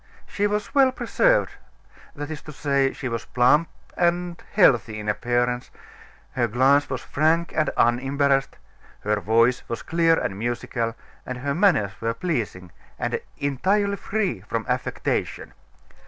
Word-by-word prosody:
She 205 0 -1
was 210 0 -3
well 270 -2 +5
preserved - - +2 0.6
that 145 +1 -6
is 155 - -6
to 155 - -10
say, 140 -2 +1
she 135 - -6
was 115 -2 -4
plump 150 +6 +3 0.3
and 175 0 0
healthy 120 - +3
in 105 - -7
appearance; 120 +3 0 0.6
her 120 -2 0
glance 135 +5 +3
was 130 - -4
frank 160 +3 +1
and 155 -1 +2
unembarrassed; 135 +3 +2 0.5
her 105 0 0
voice 115 +4 +3
was 115 - -4
clear 165 0 +3
and 95 +1 -3
musical, 120 0 -2 0.3
and 130 - -6
her 140 +3 -2
manners 155 - +3
were 115 0 -1
pleasing, 115 - -3 0.3
and - - -2 0.2
entirely 195 +9 +1
free 200 - -2
from 110 +2 -4
affectation. - - -2
135 Hz, 140 wpm, -24 LUFS, 115-170 Hz, 0.6 s, well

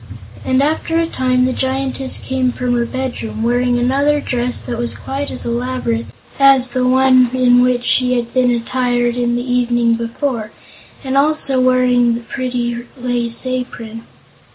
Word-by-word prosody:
And 260 +1 +1
after 320 +2 -1
a 335 - +1
time 255 -5 0
the 255 - 0
Giantess 265 0 -1
came 260 -1 -1
from 250 0 -2
her 235 -1 0
bedroom, 250 -4 -4
wearing 245 +1 +1
another 280 +4 +1
dress 245 -3 -2
that 235 -1 -5
was 240 0 -2
quite 275 +1 -5
as - - -4
elaborate 235 - -2 0.3
as 270 -2 +5
the 250 0 0
one 255 -1 +4
in 245 -1 +4
which 250 -1 +1
she 250 0 +2
had 235 -1 -3
been 255 -1 +3
attired 240 0 0
the 245 - -3
evening 240 -1 +1
before, 230 0 -3 0.5
and 265 0 -3
also 280 -2 +2
wearing 250 -2 +3
the 235 - -5
pretty 240 -1 -3 0.2
lace 245 -1 -3
apron. 245 -3 -5
250 Hz, 155 wpm, -17 LUFS, 240-260 Hz, 0.5 s, as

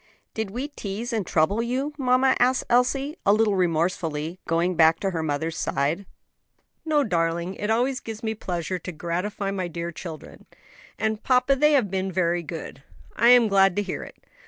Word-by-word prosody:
"Did 220 -2 -3
we 250 +8 -4
tease 230 -2 -5
and 210 -6 -1
trouble 175 +8 +2
you, 260 +5 -2
mamma?" 260 -1 +3
asked 255 +1 +3
Elsie, 270 +5 +2
a 200 - +4
little 215 0 +3
remorsefully, 170 -2 -1
going 170 +2 +1
back 165 0 +5
to 195 - 0
her 165 -3 -2
mother's 160 +1 -2
side. 150 +8 -1 0.8
"No, 305 -2 +2
darling; 170 -3 -1
it 210 +2 -4
always 250 +4 +1
gives 225 +1 -8
me 220 0 -1
pleasure 180 -3 -4
to 180 - -6
gratify 180 +5 -3
my 190 -2 -2
dear 170 +1 -5
children. 160 -2 -10 0.5
And, 220 0 -1
papa, 255 +1 +3
they 300 +3 +4
have 240 -9 +2
been 190 0 -1
very 175 -1 +1
good." 160 -4 -8 0.3
"I 235 +2 +4
am 245 -2 +7
glad 195 -2 +4
to 205 - 0
hear 190 - -4
it." - - -11
195 Hz, 180 wpm, -25 LUFS, 170-240 Hz, 0.8 s, am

